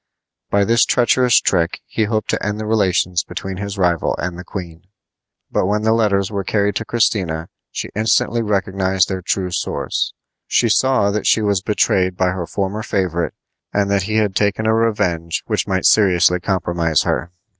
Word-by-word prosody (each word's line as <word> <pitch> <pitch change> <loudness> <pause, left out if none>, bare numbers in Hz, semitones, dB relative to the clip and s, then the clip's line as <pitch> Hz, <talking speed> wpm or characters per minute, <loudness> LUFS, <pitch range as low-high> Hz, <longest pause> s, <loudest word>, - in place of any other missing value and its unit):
By 100 0 +2
this 115 +3 +4
treacherous 125 0 +3
trick 85 -2 0
he 110 - -1
hoped 110 0 -1
to - - -2
end 105 +1 -2
the 110 - -4
relations 95 -5 +1
between 95 -1 -6
his 100 0 -5
rival 90 -3 +1
and 90 0 -3
the 90 - -8
queen; 85 -2 -8 0.6
but - - +1
when 105 +1 0
the 110 0 +3
letters 100 -4 +1
were 100 -2 -2
carried 100 +1 0
to 115 - -4
Christina 90 -9 0 0.2
she - - -5
instantly 110 +2 +1
recognized 95 -3 0
their 95 -1 -3
true 90 0 -2
source. - - -2 0.3
She 120 - +2
saw 130 -4 +3
that 105 +1 -2
she 110 - +3
was 100 -3 +1
betrayed 95 -3 +1
by 95 -1 +2
her 90 -2 -4
former 100 +2 -3
favorite 90 -5 -2 0.4
and 100 -1 +1
that 100 -1 +2
he 110 - -1
had 105 -3 +1
taken 105 +1 0
a 110 - +3
revenge 100 -8 0
which - - -1
might 95 -1 -1
seriously 90 -3 +4
compromise 85 -4 0
her. 85 - -2
100 Hz, 175 wpm, -19 LUFS, 90-105 Hz, 0.6 s, this